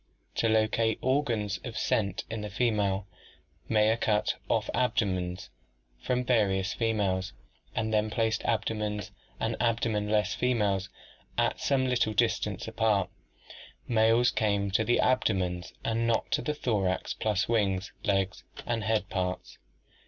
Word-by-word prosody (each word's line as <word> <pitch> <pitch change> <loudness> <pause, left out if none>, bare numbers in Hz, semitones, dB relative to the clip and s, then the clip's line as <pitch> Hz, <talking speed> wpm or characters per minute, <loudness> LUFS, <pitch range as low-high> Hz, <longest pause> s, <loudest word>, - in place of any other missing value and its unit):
To 115 - +2
locate 110 0 +2
the - - -10
organs 120 -7 0
of 120 -3 -6
scent 100 -4 0
in 110 -1 -4
the 105 - -5
female, 105 -3 0 0.6
Mayer 110 0 +3
cut 105 -2 +1 0.2
off - - +1
abdomens 95 -7 -1 0.5
from 125 0 0
various 95 -7 +2
females 100 -5 0 0.4
and 110 0 -1
then 105 0 +2
placed 110 +1 0
abdomens 105 -3 -1 0.3
and - - -1
abdomenless 110 -3 +1
females 105 -6 0 0.5
at - - +1
some 135 -2 +1
little 125 -4 +1
distance - - 0
apart 105 -4 +1 0.8
Males 115 +1 +4
came 100 -2 0
to 110 - +2
the 120 +2 +2
abdomens 90 -8 +1
and 115 +1 +1
not 115 -1 0
to - - +2
the 150 - -2
thorax 100 -9 0
plus 105 -2 0
wings, 100 -4 0
legs, 95 -2 0 0.2
and 115 -2 -1
head 110 -2 +1
parts. 90 - -3
110 Hz, 130 wpm, -29 LUFS, 100-115 Hz, 0.8 s, Males